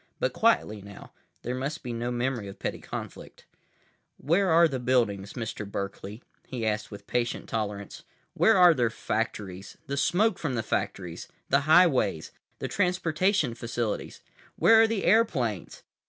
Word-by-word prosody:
But -, -, 0 dB
quietly 165 Hz, -, +2 dB
now. 100 Hz, 0 st, -12 dB, 0.3 s
There 125 Hz, -, -3 dB
must 140 Hz, +5 st, -4 dB
be 120 Hz, -2 st, -4 dB
no 120 Hz, +1 st, -3 dB
memory 120 Hz, -3 st, -2 dB
of 100 Hz, -, -9 dB
petty -, -, -4 dB
conflict. -, -, -8 dB, 0.7 s
"Where 180 Hz, +7 st, +1 dB
are 170 Hz, +1 st, +6 dB
their 135 Hz, -4 st, -3 dB
buildings, 115 Hz, -6 st, 0 dB
Mr. 115 Hz, -3 st, -5 dB
Berkeley?" 100 Hz, +3 st, -6 dB, 0.2 s
he 120 Hz, -3 st, -4 dB
asked 105 Hz, 0 st, -1 dB
with 100 Hz, -1 st, -10 dB
patient 120 Hz, +1 st, -2 dB
tolerance. 105 Hz, -2 st, -4 dB, 0.3 s
"Where -, -, +4 dB
are 180 Hz, -2 st, +8 dB
their 120 Hz, -6 st, +1 dB
factories? 105 Hz, -4 st, -4 dB
The 140 Hz, +1 st, -4 dB
smoke 195 Hz, +8 st, +2 dB
from 145 Hz, -6 st, -2 dB
their 115 Hz, -, -1 dB
factories? 90 Hz, -5 st, -3 dB, 0.2 s
The 140 Hz, +3 st, +2 dB
highways? 150 Hz, -, +4 dB, 0.3 s
The -, -, -4 dB
transportation 180 Hz, -, +1 dB
facilities? 115 Hz, -2 st, -4 dB, 0.3 s
Where 225 Hz, 0 st, +6 dB
are 225 Hz, -, +5 dB
the 220 Hz, -3 st, -2 dB
airplanes? 135 Hz, -, +1 dB
125 Hz, 150 wpm, -27 LUFS, 105-165 Hz, 0.7 s, are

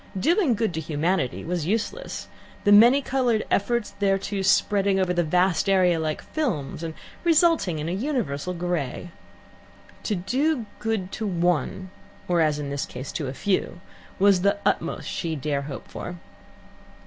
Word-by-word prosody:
Doing 330 Hz, -, +3 dB
good 215 Hz, -4 st, -1 dB
to 160 Hz, -, -2 dB
humanity 155 Hz, -2 st, -1 dB
was 170 Hz, -2 st, -2 dB
useless: 230 Hz, -, -3 dB, 0.4 s
the 205 Hz, -, +4 dB
many 240 Hz, +7 st, +7 dB
coloured 245 Hz, -5 st, +1 dB
efforts 235 Hz, +2 st, 0 dB
thereto 195 Hz, 0 st, 0 dB
spreading 195 Hz, 0 st, +3 dB
over 185 Hz, -1 st, +1 dB
the 175 Hz, -1 st, +2 dB
vast 180 Hz, +3 st, +2 dB
area 180 Hz, -3 st, +4 dB
like 155 Hz, -1 st, -2 dB
films 185 Hz, -, -3 dB
and 165 Hz, -1 st, -5 dB, 0.3 s
resulting 330 Hz, -, +3 dB
in 150 Hz, +1 st, -3 dB
an 185 Hz, +4 st, -2 dB
universal 180 Hz, -, -2 dB
grey. 175 Hz, -2 st, -3 dB, 0.9 s
To 210 Hz, -, -1 dB
do 255 Hz, -, 0 dB
good 215 Hz, -4 st, -2 dB
to 220 Hz, -, -3 dB
one, 175 Hz, 0 st, 0 dB, 0.4 s
or, 175 Hz, -2 st, +2 dB
as 155 Hz, -2 st, +2 dB
in 145 Hz, -1 st, -4 dB
this 140 Hz, -1 st, -2 dB
case, 130 Hz, +2 st, -7 dB
to 150 Hz, -, -3 dB
a 130 Hz, -, -4 dB
few, 185 Hz, -1 st, -1 dB, 0.4 s
was 195 Hz, -2 st, +4 dB
the 200 Hz, +2 st, +2 dB
utmost -, -, 0 dB
she 165 Hz, -3 st, -3 dB
dare 145 Hz, -1 st, -1 dB
hope 140 Hz, -1 st, -7 dB
for. 180 Hz, -, -7 dB
185 Hz, 155 wpm, -25 LUFS, 160-215 Hz, 0.9 s, many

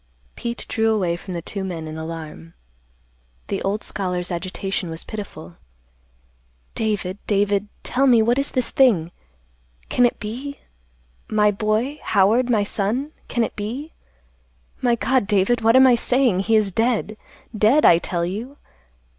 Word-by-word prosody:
Pete 235 Hz, 0 st, -4 dB
drew 225 Hz, -1 st, +1 dB
away 185 Hz, -6 st, +1 dB
from 180 Hz, +1 st, -7 dB
the 170 Hz, -, -5 dB
two 195 Hz, +2 st, -5 dB
men 170 Hz, -4 st, -5 dB
in 155 Hz, -, -7 dB
alarm. 160 Hz, -, -8 dB, 0.9 s
The -, -, -2 dB
old 200 Hz, +2 st, -2 dB
scholar's 180 Hz, -2 st, -3 dB
agitation 185 Hz, +1 st, -3 dB
was 160 Hz, 0 st, -5 dB
pitiful. 200 Hz, -, -8 dB, 1.2 s
"David, 205 Hz, -3 st, -2 dB
David; 205 Hz, 0 st, +1 dB, 0.2 s
tell 270 Hz, +2 st, +1 dB
me, 235 Hz, -3 st, +5 dB
what 240 Hz, +4 st, +2 dB
is 280 Hz, -, -1 dB
this 255 Hz, -3 st, -1 dB
thing? 195 Hz, -11 st, +3 dB, 0.8 s
Can 245 Hz, -1 st, +4 dB
it -, -, -6 dB
be—my 210 Hz, -, -4 dB
boy—Howard, 220 Hz, +1 st, +1 dB
my 215 Hz, -4 st, +3 dB
son—can 235 Hz, +5 st, -2 dB
it -, -, -4 dB
be? 245 Hz, +10 st, -5 dB, 0.9 s
My 240 Hz, -2 st, +3 dB
God, 250 Hz, -2 st, +1 dB
David, 210 Hz, +3 st, +2 dB
what 225 Hz, +2 st, +4 dB
am 260 Hz, 0 st, +8 dB
I 255 Hz, -, +6 dB
saying? 245 Hz, -4 st, +2 dB
He 220 Hz, +3 st, +2 dB
is 210 Hz, -2 st, +3 dB
dead. 225 Hz, 0 st, 0 dB, 0.4 s
Dead, 220 Hz, +8 st, +4 dB
I 170 Hz, -, +7 dB
tell 170 Hz, -1 st, -2 dB
you. 225 Hz, +10 st, -5 dB
210 Hz, 140 wpm, -22 LUFS, 180-240 Hz, 1.2 s, am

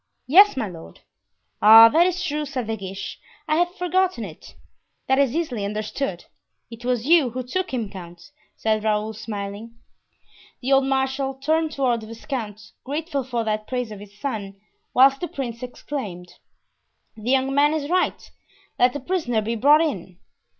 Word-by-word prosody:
"Yes, 385 Hz, +4 st, +6 dB
my 230 Hz, -5 st, -1 dB
lord." 165 Hz, -3 st, -12 dB, 0.6 s
"Ah, 225 Hz, +2 st, +10 dB
that 335 Hz, +7 st, +4 dB
is 365 Hz, 0 st, -2 dB
true," 300 Hz, +1 st, -2 dB
said 270 Hz, -5 st, -4 dB
De 225 Hz, +1 st, -2 dB
Guiche; 195 Hz, -1 st, -7 dB, 0.3 s
"I 310 Hz, 0 st, +2 dB
had 350 Hz, +1 st, +2 dB
forgotten 360 Hz, -, 0 dB
it." 160 Hz, -5 st, -12 dB, 0.5 s
"That 265 Hz, +1 st, +3 dB
is 275 Hz, -2 st, +2 dB
easily 280 Hz, -11 st, -2 dB
understood; 210 Hz, 0 st, -4 dB, 0.5 s
it 230 Hz, +1 st, -10 dB
was 245 Hz, -1 st, -1 dB
you 315 Hz, -4 st, +5 dB
who 255 Hz, +2 st, -5 dB
took 370 Hz, +10 st, -3 dB
him, 240 Hz, -5 st, -2 dB
count," 175 Hz, +4 st, -11 dB, 0.2 s
said 215 Hz, -1 st, 0 dB
Raoul, 215 Hz, 0 st, 0 dB
smiling. 210 Hz, +1 st, -7 dB, 0.8 s
The 265 Hz, +2 st, 0 dB
old 270 Hz, 0 st, +4 dB
marshal 270 Hz, 0 st, -1 dB
turned 310 Hz, +3 st, 0 dB
toward 245 Hz, -4 st, 0 dB
the 220 Hz, -, -10 dB
viscount, 225 Hz, -2 st, -6 dB
grateful 290 Hz, 0 st, -3 dB
for 240 Hz, -2 st, -2 dB
that 215 Hz, -1 st, -2 dB
praise 250 Hz, -3 st, -3 dB
of 210 Hz, -, -8 dB
his 205 Hz, 0 st, -14 dB
son, 200 Hz, -7 st, -5 dB, 0.4 s
whilst 270 Hz, +2 st, +5 dB
the 350 Hz, -, -2 dB
prince 240 Hz, -6 st, -6 dB
exclaimed: 215 Hz, -8 st, -6 dB, 0.8 s
"The 220 Hz, +2 st, -6 dB
young 265 Hz, +1 st, +2 dB
man 290 Hz, +2 st, +4 dB
is 290 Hz, -2 st, -3 dB
right; 365 Hz, +3 st, -1 dB, 0.5 s
let 245 Hz, 0 st, +4 dB
the 290 Hz, -, -4 dB
prisoner 255 Hz, -8 st, -1 dB
be 225 Hz, +2 st, -2 dB
brought 290 Hz, +7 st, +5 dB
in." 190 Hz, -, -3 dB
250 Hz, 165 wpm, -23 LUFS, 215-285 Hz, 0.8 s, Ah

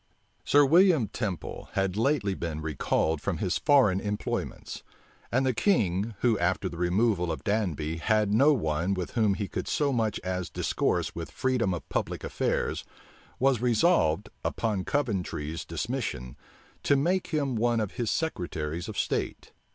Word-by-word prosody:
Sir 145 Hz, 0 st, +5 dB
William 165 Hz, -, +5 dB
Temple 100 Hz, -7 st, -4 dB
had 95 Hz, -1 st, 0 dB
lately 115 Hz, -3 st, +1 dB
been 85 Hz, -4 st, -4 dB
recalled 80 Hz, 0 st, 0 dB
from -, -, -2 dB
his -, -, -1 dB
foreign 130 Hz, -11 st, +4 dB
employments; 105 Hz, 0 st, -4 dB, 0.5 s
and 130 Hz, +3 st, +2 dB
the 130 Hz, -, +2 dB
king, 110 Hz, -, +1 dB
who, 115 Hz, -4 st, +3 dB
after 90 Hz, +2 st, +1 dB
the 85 Hz, -2 st, -7 dB
removal 90 Hz, 0 st, +1 dB
of 80 Hz, -, -5 dB
Danby, 85 Hz, -7 st, -1 dB
had 105 Hz, +4 st, +1 dB
no 140 Hz, +7 st, +6 dB
one 90 Hz, -, 0 dB
with 90 Hz, -2 st, -4 dB
whom 110 Hz, -4 st, +2 dB
he 100 Hz, -1 st, -3 dB
could -, -, -4 dB
so 145 Hz, -2 st, +1 dB
much 110 Hz, -3 st, 0 dB
as 90 Hz, -1 st, -3 dB
discourse -, -, -1 dB
with -, -, -6 dB
freedom 125 Hz, -6 st, 0 dB
of 90 Hz, -, -4 dB
public -, -, -3 dB
affairs, -, -, -1 dB, 0.5 s
was 130 Hz, -3 st, +2 dB
resolved, 120 Hz, -, +2 dB
upon 105 Hz, -5 st, -1 dB
Coventry's 90 Hz, -, -2 dB
dismission, 85 Hz, -, -4 dB, 0.5 s
to 140 Hz, -, +3 dB
make 175 Hz, +7 st, +1 dB
him 140 Hz, -5 st, -1 dB
one 120 Hz, +1 st, +2 dB
of 105 Hz, -3 st, -2 dB
his 120 Hz, -3 st, -2 dB
secretaries 85 Hz, -, -3 dB
of 110 Hz, -, -7 dB
state. -, -, -2 dB
105 Hz, 150 wpm, -28 LUFS, 90-130 Hz, 0.5 s, no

